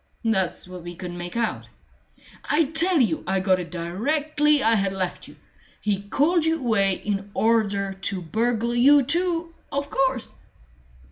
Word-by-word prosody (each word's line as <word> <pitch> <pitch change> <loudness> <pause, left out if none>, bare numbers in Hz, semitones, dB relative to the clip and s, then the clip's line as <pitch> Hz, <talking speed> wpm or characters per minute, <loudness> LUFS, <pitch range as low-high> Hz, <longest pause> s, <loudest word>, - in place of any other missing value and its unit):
"That's 190 -6 0
what 180 -1 -9
we 175 +1 -8
couldn't 175 0 -7
make 175 +5 -6
out." 230 -1 -2 0.8
"I 310 +3 +4
tell 325 +3 +1
you 215 -11 +1
I 190 +1 +1
got 185 -1 +2
it 175 - -6
directly 290 - +1
I 225 - +4
had 195 -3 +1
left 185 -2 -4
you. - - -14 0.4
He 205 -2 -1
called 300 - +1
you 320 0 +1
away 220 -8 +2
in 200 +1 -4
order 205 -3 +1
to 190 0 0
burgle 230 +6 -1
you 275 +4 +6
too, 335 +3 0 0.2
of 280 0 -3
course!" 265 -3 0
225 Hz, 155 wpm, -24 LUFS, 190-285 Hz, 0.8 s, you